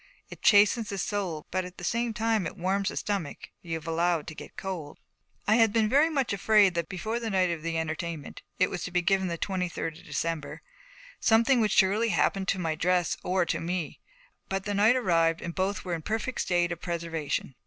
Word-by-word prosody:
It - - -10
chastens 210 +2 +5
the 200 - -4
soul 190 -5 -2
but 185 0 0
at 180 0 -10
the - - -10
same 235 +5 0
time 220 -3 0
it - - -9
warms 195 +3 0
the - - -6
stomach 195 -8 -3
you've 165 -2 -5
allowed 165 -1 +1
to 160 - -7
get - - -11
cold. 175 -6 -5 0.5
I 215 +2 +5
had 225 -2 +5
been 220 -1 +2
very 285 +8 +4
much 275 -8 0
afraid 200 -1 +4
that 170 -2 -2
before 220 +5 -3
the 230 -1 -3
night 185 -3 +2
of 165 -2 -4
the 165 0 -2
entertainment, 160 -1 -4 0.2
it 185 - +2
was 180 - -4
to - - -4
be 180 0 +1
given 190 0 +2
the 170 -1 -3
twenty 185 0 -2
third 165 -1 -5
of - - -16
December, 165 -3 -3 0.6
something 235 +2 +4
would 215 - +2
surely 205 +4 +3
happen 195 -2 +1
to 195 - +1
my 165 -3 -1
dress 175 +1 +1
or 185 0 +1
to - - -1
me; 170 -1 -3 0.5
but 195 0 -2
the 205 0 -2
night 210 +5 +4
arrived 165 -8 +2
and 170 - -5
both 190 +2 -2
were 180 - -2
in 165 - -2
a - - -11
perfect 220 +7 -2
state 175 -1 +1
of 170 0 -5
preservation. 165 -5 -3
185 Hz, 215 wpm, -28 LUFS, 170-210 Hz, 0.6 s, chastens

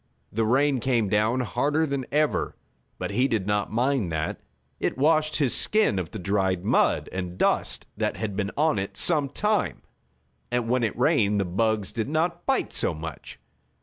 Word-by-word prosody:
The 110 +1 0
rain 135 +3 +2
came 120 -4 +1
down 110 +5 +2
harder 145 +7 0
than 140 -3 -3
ever, 150 +1 0 0.4
but - - -4
he 130 +2 +2
did 110 -7 -1
not 105 0 -1
mind 120 -4 0
that. 80 0 -3 0.4
It - - -1
washed 155 +2 +2
his 140 -5 +2
skin 215 - +3
of 85 -3 -4
the - - -7
dried 95 -1 0
mud - - +2
and 90 -1 -5
dust - - 0
that - - -1
had 105 -3 -3
been 100 -1 -1
on 155 -7 +2
it 95 - -5
some 150 -5 +3
time, 210 +8 -1 0.7
and 120 -1 -1
when 125 +1 +1
it 110 - -1
rained 115 -7 +2
the 100 - 0
bugs 105 +2 0
did 115 +2 -3
not 170 +3 -1
bite 270 -1 0
so 85 - +1
much. 80 -1 -8
120 Hz, 180 wpm, -25 LUFS, 100-145 Hz, 0.7 s, skin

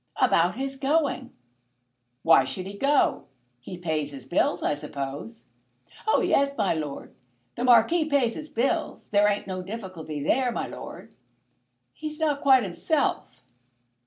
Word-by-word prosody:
"About 175 +3 +3
his 270 +2 -4
going." 275 -2 0 0.9
"Why 165 -5 +6
should 180 +7 -6
he 195 +1 -7
go? 275 +6 +2 0.3
He 175 +9 -9
pays 155 -4 -2
his 135 -3 -10
bills, 175 0 +1
I - - +1
suppose?" 145 - -6 0.6
"Oh 440 - +4
yes, 280 0 +2
my 205 -5 +2
lord; 150 -3 -5 0.4
the 240 - -3
Marquis 305 +7 +5
pays 280 -6 +1
his 305 +4 -8
bills. 295 +5 -1
There 205 0 +4
ain't 205 0 -1
no 185 -1 -4
difficulty 180 -7 -6
there, 250 - +2
my - - -3
lord. - - -9 0.8
He's 310 0 -7
not 295 -3 0
quite 265 -3 +5
himself." 205 - -1
225 Hz, 140 wpm, -26 LUFS, 165-280 Hz, 0.9 s, Why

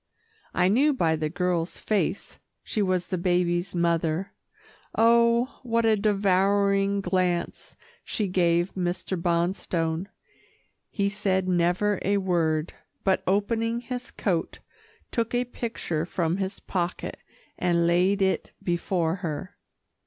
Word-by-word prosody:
I 180 0 +4
knew 270 +10 +4
by 165 -9 +2
the 155 -1 -2
girl's 175 0 -1
face 215 -2 -1 0.2
she 215 - -2
was 185 -2 +1
the 185 -1 -3
baby's 175 0 0
mother. 170 +1 0 0.6
Oh! 235 +2 +4
what 230 -2 +1
a 220 -1 +5
devouring 200 -1 +2
glance 180 -2 -1 0.3
she 210 - -2
gave 175 -1 +2
Mr. 180 +1 -2
Bonstone. 170 0 -1 0.8
He 200 -2 0
said 195 -2 0
never 180 +3 +2
a 200 +1 +1
word, 165 -5 0 0.3
but 190 -1 +2
opening 225 +4 +1
his 250 +1 -6
coat, 175 -5 -2 0.5
took 230 0 -1
a 245 +1 +1
picture 200 -10 -3
from 170 -1 -1
his 195 0 -3
pocket 175 -2 -3 0.4
and 170 -1 +2
laid 185 +4 +3
it 190 - 0
before 175 -1 0
her. 180 +1 -5
185 Hz, 120 wpm, -26 LUFS, 175-205 Hz, 0.8 s, a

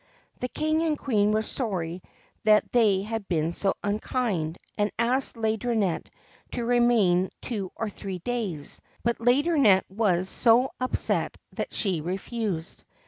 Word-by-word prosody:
The 250 - -3
King 310 +4 0
and 315 -2 +1
Queen 210 -7 +1
were 215 +1 +1
sorry 185 -9 -2 0.4
that 215 0 +4
they 210 -5 +3
had 220 -1 -4
been 165 -2 0
so 195 +3 0
unkind, 205 -5 -1 0.2
and 205 0 +1
asked 250 +4 +1
Laideronnette 220 -4 0 0.5
to 240 - -2
remain 230 -7 +3
two 200 -7 -4
or 225 - -2
three 195 -2 -6
days; 190 -7 -3 0.2
but 235 0 0
Laideron 285 +7 +3
nette 195 -6 +5
was 190 -3 +1
so 240 +5 +4
upset 255 - 0 0.2
that - - -4
she 185 -7 0
refused. 190 0 -3
215 Hz, 140 wpm, -26 LUFS, 190-240 Hz, 0.5 s, nette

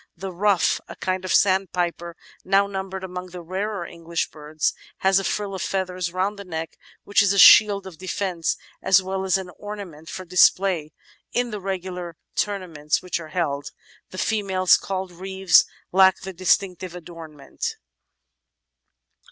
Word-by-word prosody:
The 190 +2 -5
Ruff, 195 0 +2
a - - -9
kind 185 0 -2
of 185 - -3
sandpiper 175 -3 +1 0.3
now 195 +1 +3
numbered 190 -1 -5
among 180 0 -6
the 180 -1 -9
rarer 190 +2 -3
English 170 0 -4
birds, 155 0 -2 0.3
has 190 0 +4
a - - -4
frill 200 0 -2
of 190 - -4
feathers 185 -2 -2
round 195 +3 -1
the - - -6
neck, 165 -3 -6 0.2
which 205 - +3
is 200 -1 +3
a - - -1
shield 200 0 +8
of 185 -4 -10
defence 185 -2 -2 0.2
as 190 0 +4
well 190 0 -3
as 190 -1 +3
an 185 -2 -7
ornament 195 -7 -8
for 185 - -7
display 180 -2 +3 0.4
in 245 -1 0
the 210 -1 -5
regular 180 -3 -5 0.2
tournaments 175 -8 -1
which 180 -1 -2
are 165 - -8
held; 145 -4 -2 0.4
the 185 - -10
females, 190 -4 +3
called 190 -1 -4
reeves, 190 +1 +3 0.3
lack 190 0 +5
the 190 0 -7
distinctive 185 0 0
adornment. 160 -4 -7
185 Hz, 150 wpm, -23 LUFS, 170-195 Hz, 0.4 s, shield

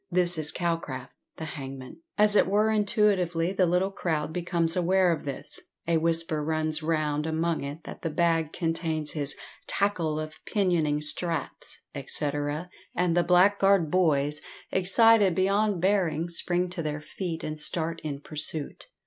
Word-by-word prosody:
This 175 -2 +2
is 150 -1 +3
Calcraft, 165 -7 -3 0.2
the 160 - -5
hangman. 135 -3 -8 0.2
As 210 -1 +5
it - - +5
were 210 +3 +2
intuitively 195 -5 +1
the 185 -2 +2
little 180 +3 +1
crowd 160 -5 -2
becomes 170 -1 0
aware 185 0 +3
of 160 -3 -3
this, 145 +2 -3 0.3
a 170 -1 +2
whisper 165 -1 +1
runs 155 0 -1
round 155 -1 -1
among 160 0 -1
it 145 +3 -7
that - - -9
the 165 - -2
bag 165 0 +1
contains 165 -2 -2
his 145 -2 -2 0.3
"tackle" 170 -7 0
of 155 0 -8
pinioning 170 -7 +1
straps, 165 0 +1
&c., 150 - -1 0.7
and 175 -2 +1
the 175 - +3
blackguard 190 -1 +4
boys, 150 -5 +2 0.3
excited 200 0 +4
beyond 200 +1 +1
bearing, 175 -4 +1
spring 175 +1 +2
to 175 - -4
their 150 -1 -3
feet 165 +1 -6
and 155 0 -4
start 165 +2 0
in 145 -2 -5
pursuit. 155 - -4
165 Hz, 150 wpm, -27 LUFS, 155-185 Hz, 0.7 s, As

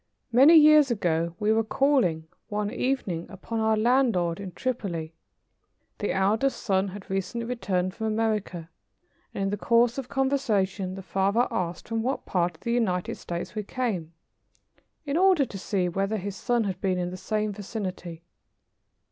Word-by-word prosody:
Many 270 +8 +7
years 305 -2 +7
ago 170 -6 0
we 215 +1 +2
were 225 0 +2
calling, 220 - +1 0.2
one 210 -1 -2
evening, 250 -10 -2
upon 215 +3 -5
our 220 0 +2
landlord 220 -8 +2
in 195 -2 -6
Tripoli. 175 -8 -3 0.9
The 205 - -1
eldest 215 +8 +1
son 195 -2 +1
had 195 0 -9
recently 195 +5 -3
returned 185 -7 -1
from 220 +1 -3
America, 215 -6 -2 0.6
and 195 - -3
in 195 - 0
the 205 - -1
course 235 +4 +3
of 255 - -7
conversation 215 -9 0
the 195 - -8
father 195 +6 +1
asked 175 -1 -3
from 225 0 -1
what 260 +4 -2
part 175 -2 0
of - - -37
the 235 - -1
United 185 -7 0
States 170 0 -6
we 215 - -2
came, 200 -8 -3 0.9
in 285 +1 -1
order 370 -6 +4
to 195 - -8
see 185 -2 -1
whether 195 +4 -1
his 200 0 -5
son 240 +3 0
had 190 -3 -4
been 185 -2 +1
in 180 0 -2
the - - -6
same 210 +3 -2
vicinity. 185 -5 -6
205 Hz, 165 wpm, -26 LUFS, 185-235 Hz, 0.9 s, Many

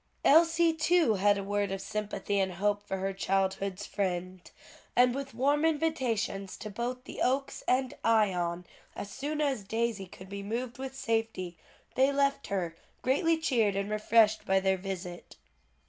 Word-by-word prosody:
'" - - -17
Elsie 330 +2 +5
too 320 -5 +3
had 205 +1 +3
a 200 - -3
word 205 0 -1
of 195 - -2
sympathy 205 0 -2
and 190 -1 0
hope 205 +3 0
for 195 -2 -4
her 195 +1 -2
childhood's 195 0 -1
friend, 185 -2 -3 0.5
and 245 0 +5
with 270 -2 -5
warm 285 +5 +2
invitations 260 -11 0
to 215 - -7
both 245 +4 -4
the - - -8
Oaks 270 +2 0
and 255 0 +2
Ion 180 -6 +2 0.3
as 200 - -6
soon 295 +5 -3
as 275 -8 0
Daisy 225 -1 -2
could 185 +1 -12
be 200 +1 -6
moved 235 +4 -4
with 265 0 -5
safety, 225 -8 -2 0.4
they 265 +2 +4
left 280 0 +1
her, 175 -4 -2 0.3
greatly 320 +6 +2
cheered 235 - +1
and 200 +1 -2
refreshed 215 0 +3
by 190 0 +3
their 190 0 +2
visit. 180 -2 -6
215 Hz, 160 wpm, -30 LUFS, 195-265 Hz, 0.5 s, Elsie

